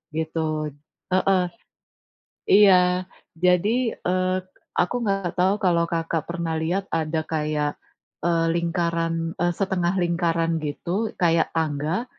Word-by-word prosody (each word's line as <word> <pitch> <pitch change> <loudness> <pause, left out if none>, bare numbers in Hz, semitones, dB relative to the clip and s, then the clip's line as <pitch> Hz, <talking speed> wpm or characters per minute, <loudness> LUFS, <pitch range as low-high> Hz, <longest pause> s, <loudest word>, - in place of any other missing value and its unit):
gitu. 155 -1 -2 0.4
Heeh, 185 0 +3 1.1
iya. 185 -2 +5 0.4
Jadi, 215 +7 +3
eee, 185 +1 0 0.4
aku 180 +7 0
nggak 195 -4 -1
tahu 185 +2 +4
kalau, 170 -2 +3
Kakak, 165 -1 -1
pernah 170 -2 -2
lihat 185 +4 0
ada 160 0 0
kayak, 150 -2 -1 0.5
eee, 165 -1 +2
lingkaran, 165 -1 -1
eee, 175 0 +2
setengah 190 -2 0
lingkaran 165 -1 +1
gitu 175 +9 -2
kayak 165 -1 +3
tangga. 155 +6 -1
170 Hz, 110 wpm, -24 LUFS, 165-185 Hz, 1.1 s, iya